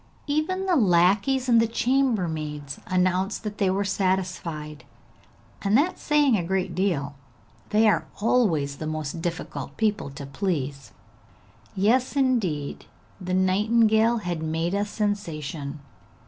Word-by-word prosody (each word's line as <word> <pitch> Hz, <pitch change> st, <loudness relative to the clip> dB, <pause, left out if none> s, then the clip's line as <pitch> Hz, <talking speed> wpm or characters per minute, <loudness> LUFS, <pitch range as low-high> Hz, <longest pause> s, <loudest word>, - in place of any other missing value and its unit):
Even 310 Hz, +6 st, -1 dB
the 370 Hz, -2 st, +2 dB
lackeys 205 Hz, -, +3 dB
and 230 Hz, -2 st, +5 dB
the 230 Hz, -, +2 dB
chambermaids 170 Hz, -, -1 dB
announced 185 Hz, +3 st, 0 dB
that 210 Hz, -1 st, -6 dB
they 195 Hz, -, +2 dB
were 195 Hz, +2 st, +1 dB
satisfied, 180 Hz, -6 st, -2 dB, 0.8 s
and 200 Hz, +3 st, +3 dB
that 340 Hz, +7 st, +2 dB
is -, -, -22 dB
saying 295 Hz, -5 st, +3 dB
a 185 Hz, -, 0 dB
great 185 Hz, 0 st, -1 dB
deal; 165 Hz, -7 st, -1 dB, 0.6 s
they 220 Hz, +1 st, +4 dB
are 160 Hz, -6 st, +2 dB
always 170 Hz, -, +1 dB
the 155 Hz, -, -5 dB
most 155 Hz, +1 st, -4 dB
difficult 170 Hz, 0 st, -5 dB
people 210 Hz, -8 st, 0 dB
to 140 Hz, +1 st, -8 dB
please. 140 Hz, -4 st, -3 dB, 0.8 s
Yes, 240 Hz, +8 st, +2 dB
indeed, 215 Hz, -, 0 dB, 0.4 s
the 185 Hz, 0 st, -1 dB
nightingale 220 Hz, +4 st, +3 dB
had 175 Hz, -6 st, -3 dB
made 160 Hz, +2 st, -1 dB
a 200 Hz, +1 st, +1 dB
sensation. 160 Hz, -9 st, -3 dB
190 Hz, 130 wpm, -25 LUFS, 160-225 Hz, 0.8 s, and